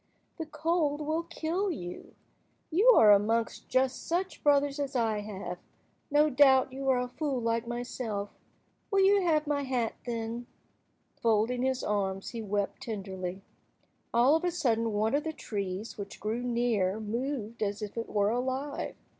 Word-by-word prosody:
The 320 - -4
cold 305 -1 0
will 310 +2 0
kill 340 +3 -2
you. 180 - -7 0.6
You 385 +9 +3
are 210 - +8
amongst 220 +3 +2
just 260 0 +1
such 365 +3 -2
brothers 285 0 +3
as 280 -1 -3
I 225 -3 +1
have. 195 -4 -6 0.5
No 295 +1 +4
doubt 265 -2 +5
you 270 0 -2
are 260 - +4
a 250 - -1
fool 270 +1 -2
like 230 0 -1
myself. 240 -4 -4 0.6
Will 395 -2 +3
you 395 +1 +5
have 315 -4 +2
my 290 -1 0
hat, 255 -4 -1
then?" 230 +1 -3 0.7
Folding 230 +2 +2
his 260 0 0
arms, 195 -2 -1
he 230 - -5
wept 205 -1 -2
tenderly. 190 -3 -5 0.7
All 250 +6 +5
of 325 - 0
a 355 - +2
sudden 235 -10 0
one 215 +3 +1
of 290 +1 +2
the 320 - -3
trees 200 -5 -5
which 200 -1 -7
grew 220 +3 -2
near 235 -5 +1
moved 235 +1 -3
as 205 0 -1
if 205 - -6
it 230 -1 -4
were 205 0 +2
alive. 260 +4 -2
245 Hz, 160 wpm, -30 LUFS, 210-290 Hz, 0.7 s, are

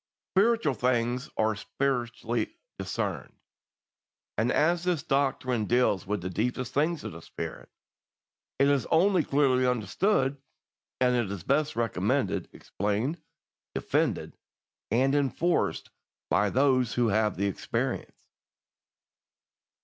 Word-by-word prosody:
Spiritual 215 - +3
things 125 +1 0
are 110 0 +2
spiritually 120 - -2 0.2
discerned, - - -3 1.0
and - - +1
as 170 +2 +2
this 175 -4 0
doctrine 130 -6 0
deals 120 -5 +2
with 105 -2 -1
the 90 - -2
deepest 120 +5 -2
things 155 +3 +1
of - - -5
the 85 +1 -10
Spirit, - - -7 0.9
it 140 - +4
is 140 -2 +2
only 180 +1 +4
clearly 130 -3 +2
understood 135 - +1 0.6
and 125 -4 +2
is 100 -4 -5
best 150 +2 +1
recommended, 115 0 0
explained, 110 - -2 0.5
defended, - - 0 0.5
and 130 +5 +2
enforced 145 +5 0 0.4
by 105 0 +3
those 130 -1 +2
who 120 -2 +2
have 105 -2 +1
the 100 - 0
experience. 100 - -3
130 Hz, 110 wpm, -28 LUFS, 110-145 Hz, 1.0 s, it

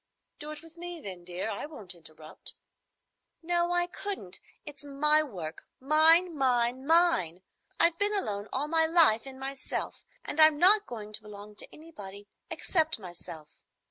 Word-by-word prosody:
"Do 300 - -8
it 305 +1 -9
with 330 0 -17
me, 350 0 -7
then, 185 - -10
dear. 180 +3 -5
I - - -6
won't 215 - -8
interrupt." 155 -2 -3 0.9
"No, 345 +1 0
I 350 0 +2
couldn't. 355 - +1 0.3
It's 290 -1 -11
my 300 +2 +3
work,—mine,—mine,—mine! 270 - +1 0.4
I've 335 0 +3
been 410 +1 0
alone 210 - 0
all 275 +3 -1
my 320 0 +2
life 315 -9 +4
in 265 -1 -10
myself, 270 0 -5 0.2
and 315 - -5
I'm 310 -1 +7
not 405 +6 +5
going 215 -3 -9
to 215 - +1
belong 210 0 -12
to - - -7
anybody 205 -11 -12 0.2
except 320 -3 -1
myself. 175 -5 -10
280 Hz, 140 wpm, -28 LUFS, 205-330 Hz, 0.9 s, I'm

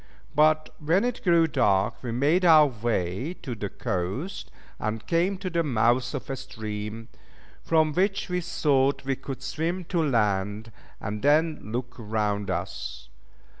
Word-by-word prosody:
But 155 +1 +3
when 165 +7 +2
it 245 -1 -3
grew 170 -3 +5
dark 100 -9 +1
we 120 - -4
made 145 +10 +2
our 160 -3 +8
way 115 - -2
to 130 - -4
the 105 -3 -4
coast, 100 - -3 0.3
and 110 0 -3
came 175 - +1
to 185 0 -5
the 170 0 +2
mouth 120 -2 +1
of 135 - -5
a - - -1
stream, 110 -3 -6 0.5
from 155 -2 +2
which 195 +3 +1
we 180 -1 -1
thought 140 -5 +1
we 135 0 0
could 135 0 -7
swim 165 +6 -2
to 170 - +3
land, 105 -5 0 0.3
and 105 +1 -4
then 155 +2 +3
look 125 +1 -3
round 105 -2 -1
us. 85 -9 -4
130 Hz, 150 wpm, -26 LUFS, 110-160 Hz, 0.5 s, our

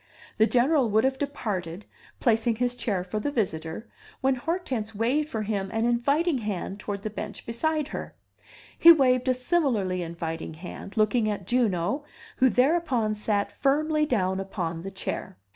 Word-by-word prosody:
The 220 - +5
General 255 +1 +3
would 215 +1 +3
have 265 0 +1
departed, 205 - -3 0.3
placing 230 0 +2
his 245 +1 0
chair 205 -7 -1
for 190 +4 -3
the 250 - -1
visitor, 190 - -3 0.3
when 265 0 +2
Hortense 255 - -3
waved 265 +8 +1
for 220 -5 -2
him 200 -2 -2
an 225 +3 0
inviting 280 +6 +2
hand 200 -2 -4
toward 205 -1 -5
the 215 - -3
bench 210 0 -7
beside 305 +5 -1
her; - - -6 0.6
he 335 - +9
waved 255 -5 +4
a 255 - +4
similarly 250 - 0
inviting 165 -1 -5
hand, 185 +5 -9
looking 215 +1 +3
at 200 -3 -3
Juno, 240 - +1 0.3
who 260 -1 +5
thereupon 255 -5 +2
sat 210 -1 -1
firmly 305 +2 +1
down 190 -7 +1
upon 175 -4 -3
the 195 - -5
chair. 190 - -5
225 Hz, 160 wpm, -26 LUFS, 195-265 Hz, 0.6 s, he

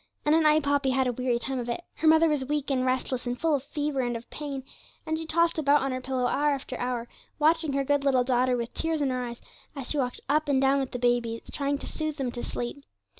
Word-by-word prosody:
And 300 - +4
at 325 - +5
night 305 -1 +4
Poppy 285 -1 +2
had 260 0 +2
a 250 - 0
weary 250 0 0
time 265 +2 -3
of 240 0 -4
it. 240 +9 -3
Her 320 - +1
mother 320 +1 +6
was 300 -4 +1
weak 290 +1 -2
and 255 -2 +1
restless, 255 -1 -1
and 245 0 -2
full 325 -2 +2
of 280 - +1
fever 290 -1 -2
and 240 -1 -1
of 230 - -12
pain, 280 -3 -5 0.4
and 315 - -1
she 320 0 -5
tossed 335 0 +2
about 290 -2 +4
on 270 - -1
her 255 0 -3
pillow 255 -1 -1
hour 290 +3 +2
after 260 -1 -7
hour, 245 -1 -2 0.3
watching 315 -1 +2
her 275 0 +1
good 285 0 +1
little 265 -3 +3
daughter 250 0 +2
with 235 0 -4
tears 320 -2 -1
in 270 - +1
her 255 0 -1
eyes, 235 -1 -7 0.3
as 275 -3 -6
she 300 - 0
walked 250 -2 -2
up 300 +1 +1
and 275 -2 +3
down 270 +1 +3
with 265 -1 -2
the - - -4
babies, 240 -2 +1
trying 280 0 0
to - - -9
soothe 310 -1 -4
them 265 -4 -2
to 240 - -6
sleep. 245 +4 -5
270 Hz, 265 wpm, -27 LUFS, 250-295 Hz, 0.4 s, mother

